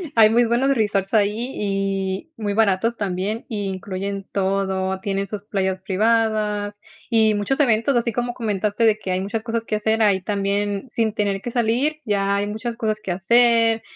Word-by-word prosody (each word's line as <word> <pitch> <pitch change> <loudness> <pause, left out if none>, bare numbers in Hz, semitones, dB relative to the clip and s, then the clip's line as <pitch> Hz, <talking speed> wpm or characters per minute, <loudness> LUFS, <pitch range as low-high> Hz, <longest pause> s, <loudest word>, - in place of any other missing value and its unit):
hay 220 -2 +7
muy 235 +2 +4
buenos 260 +4 +2
resorts 200 -4 0
ahí 220 +4 +1
y 195 +4 -2
muy 205 -2 -3
baratos 220 +2 +2
también, 200 +3 -2
y 215 -5 -3
incluyen 195 +1 -4
todo, 190 -1 0
tienen 195 0 -2
sus 200 +1 -6
playas 190 -2 -1
privadas 210 0 0 0.3
y 220 -2 +4
muchos 210 +8 -1
eventos, 240 +1 +2
así 235 0 +1
como 240 +2 -2
comentaste 210 -1 -1
de 215 -1 +3
que 190 -3 -4
hay 185 +1 0
muchas 215 +3 -3
cosas 230 -1 -2
que 220 - -2
hacer, 220 +1 0
ahí 200 -3 +3
también 200 +2 -1
sin 225 -2 0
tener 200 -2 -1
que 240 - -4
salir, 250 +6 0
ya 200 -2 +1
hay 200 0 0
muchas 225 +3 -4
cosas 215 -2 -1
que 190 - -4
hacer, 230 +3 +4
210 Hz, 175 wpm, -22 LUFS, 195-230 Hz, 0.3 s, hay